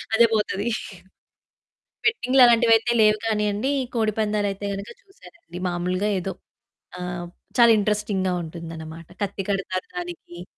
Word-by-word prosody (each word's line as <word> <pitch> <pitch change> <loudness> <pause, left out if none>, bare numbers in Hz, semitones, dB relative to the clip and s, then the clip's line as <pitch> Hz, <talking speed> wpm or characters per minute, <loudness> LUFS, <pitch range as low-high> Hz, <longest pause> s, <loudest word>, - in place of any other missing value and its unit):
అదే 235 +1 +7
పోతది. 210 0 0 1.4
బెట్టింగ్లు 270 - +3
అలాంటివి 235 -1 +5
అయితే 235 +2 -2
లేవు 215 0 +5
కానియండి, 210 +4 0 0.2
కోడిపందాలు 215 -2 0
అయితే 200 +1 -7
గనక 200 +1 -6
చూసానండి. 345 - -14
మామూలుగా 180 +4 -1
ఏదో 190 +1 -4 0.7
ఆహ్, 175 -1 -5 0.3
చాలా 235 -1 +8
ఇంటరెస్టింగ్‌గా 205 -3 0
ఉంటుందన్నమాట. 165 0 -8
కత్తి 195 -1 -3
కడతారు 190 -1 -2
దానికి. 345 - -7
205 Hz, 115 wpm, -24 LUFS, 180-225 Hz, 1.4 s, చాలా